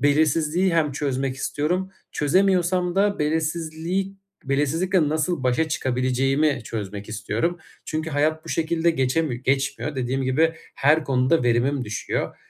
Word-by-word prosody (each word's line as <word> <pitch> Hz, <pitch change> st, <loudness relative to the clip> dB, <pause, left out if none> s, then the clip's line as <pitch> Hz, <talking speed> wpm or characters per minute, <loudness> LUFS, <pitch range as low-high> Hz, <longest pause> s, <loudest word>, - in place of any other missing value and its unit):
belirsizliği 155 Hz, +5 st, +2 dB
hem 150 Hz, -4 st, +2 dB
çözmek 135 Hz, -2 st, -2 dB
istiyorum. 175 Hz, +8 st, -1 dB, 0.2 s
Çözemiyorsam 180 Hz, +2 st, +2 dB
da 200 Hz, +1 st, +2 dB
belirsizliği 160 Hz, +5 st, -1 dB, 0.3 s
belirsizlikle 150 Hz, +5 st, +1 dB
nasıl 155 Hz, 0 st, -1 dB
başa 130 Hz, +6 st, +1 dB
çıkabileceğimi 135 Hz, +1 st, +1 dB
çözmek 105 Hz, -2 st, -5 dB
istiyorum. 110 Hz, -, -2 dB, 0.3 s
Çünkü 155 Hz, +1 st, -3 dB
hayat 155 Hz, +2 st, 0 dB
bu -, -, -11 dB
şekilde 165 Hz, +1 st, +1 dB
geçemi 135 Hz, -3 st, 0 dB
geçmiyor. 135 Hz, +2 st, -1 dB
Dediğim 130 Hz, +1 st, -1 dB
gibi 155 Hz, +6 st, +2 dB, 0.2 s
her 150 Hz, +3 st, +3 dB
konuda 130 Hz, +3 st, +2 dB
verimim 125 Hz, +3 st, +1 dB
düşüyor. 105 Hz, -1 st, -3 dB
150 Hz, 120 wpm, -23 LUFS, 130-165 Hz, 0.3 s, her